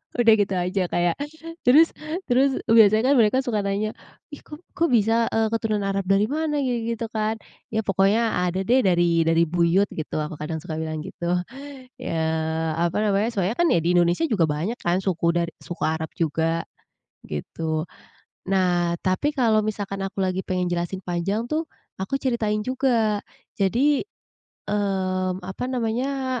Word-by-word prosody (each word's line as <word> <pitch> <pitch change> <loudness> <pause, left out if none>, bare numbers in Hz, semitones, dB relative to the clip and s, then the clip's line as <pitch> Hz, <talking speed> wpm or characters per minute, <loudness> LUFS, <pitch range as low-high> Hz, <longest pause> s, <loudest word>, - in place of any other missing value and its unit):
udah 230 -2 +5
gitu 195 -2 +1
aja, 180 +2 0
kayak 175 +3 0 0.5
terus 310 +6 +7 0.4
terus 265 +2 +3 0.2
biasanya 220 +3 +6
kan - - +5
mereka 230 +5 +3
suka 220 -4 -1
nanya, 200 +2 -1 0.4
"Ih 290 - -8
kok 300 +4 -12
kok 335 - +1
bisa, 230 -1 +3
eee, 220 0 +1
keturunan 215 -3 0
Arab 195 -1 -1
dari 200 +5 +2
mana?" 310 0 -1
Gitu-gitu 230 -2 -2
kan. 220 0 -1 0.4
Ya 220 - +1
pokoknya 195 0 +2
ada 185 +2 -1
deh, 250 +6 +3
dari 175 -5 +3
dari 165 +1 +4
buyut 170 +4 +2
gitu, 155 - -5
aku 150 0 -7
kadang 160 +1 -4
suka 160 -1 -5
bilang 155 -1 -4
gitu. 175 -1 -2 0.7
Ya 165 - -2 0.6
apa 170 +3 0
namanya, 210 +2 +1
soalnya 200 0 -1
kan 345 +3 +2
di 170 +1 +2
Indonesia 175 - +3
juga 210 - +1
banyak 165 +11 -2
kan 175 +1 +1
suku 175 -3 0
dar 170 0 +1 0.2
suku 175 - -3
Arab 160 0 -2
juga. 165 +1 0 0.6
Gitu. 155 - -4 0.6
Nah, 175 -3 +2
tapi 190 +11 +1
kalau 225 -5 +3
misalkan 205 -2 -3
aku 195 0 -5
lagi 185 0 -1
pengen 180 -1 -1
jelasin 175 +2 -2
panjang 185 +6 -1
tuh, 315 +4 -1 0.4
aku 195 +8 -2
ceritain 225 -5 0
juga. 240 -5 +1 0.4
Jadi, 260 +9 +3 0.7
mmm, 190 -2 -1
apa 190 +6 -5
namanya, 255 +2 -1
195 Hz, 155 wpm, -24 LUFS, 175-230 Hz, 0.7 s, terus